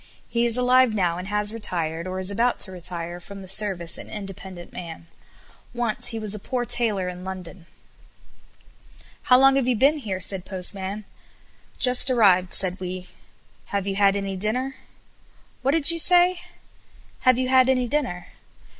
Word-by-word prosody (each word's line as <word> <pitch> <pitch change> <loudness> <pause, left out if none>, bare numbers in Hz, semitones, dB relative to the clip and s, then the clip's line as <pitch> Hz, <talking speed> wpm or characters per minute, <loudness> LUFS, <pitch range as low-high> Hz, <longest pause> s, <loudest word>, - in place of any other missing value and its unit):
He 235 0 0
is 235 +1 0
alive 250 -2 +3
now 175 -4 0
and 180 - -7
has 210 +1 0
retired, 170 -6 -3
or 185 0 -4
is 190 +1 -1
about 235 +4 +1
to 190 - -2
retire 175 -1 -5
from 195 +2 -11
the - - -12
service 190 -3 +2
an - - -11
independent 190 -3 -9
man. 165 -2 -9 0.7
Once 240 -3 -1
he 225 - -3
was 215 -2 -3
a 210 - -4
poor 245 +4 -3
tailor 215 -7 +2
in 180 0 -7
London. 185 -2 -9 1.6
"How 250 - +8
long 270 +1 +5
have 265 -2 0
you 250 - +2
been 275 +7 +3
here?" 195 -8 -4
said 190 0 -1
Postman. 195 +2 -4 0.7
"Just 250 0 +6
arrived," 190 -7 +3
said 185 -1 +1
we. 185 0 -6 0.6
"Have 200 -1 -3
you 195 -1 -2
had 200 0 +3
any 195 -1 -3
dinner?" 250 +7 -2 0.9
"What 260 - -1
did 325 0 +3
you 335 - -2
say?" 355 +1 +5 0.8
"Have 255 -1 +3
you 255 0 -1
had 260 0 +4
any 255 -2 +1
dinner?" 235 -11 -2
200 Hz, 165 wpm, -23 LUFS, 185-250 Hz, 1.6 s, How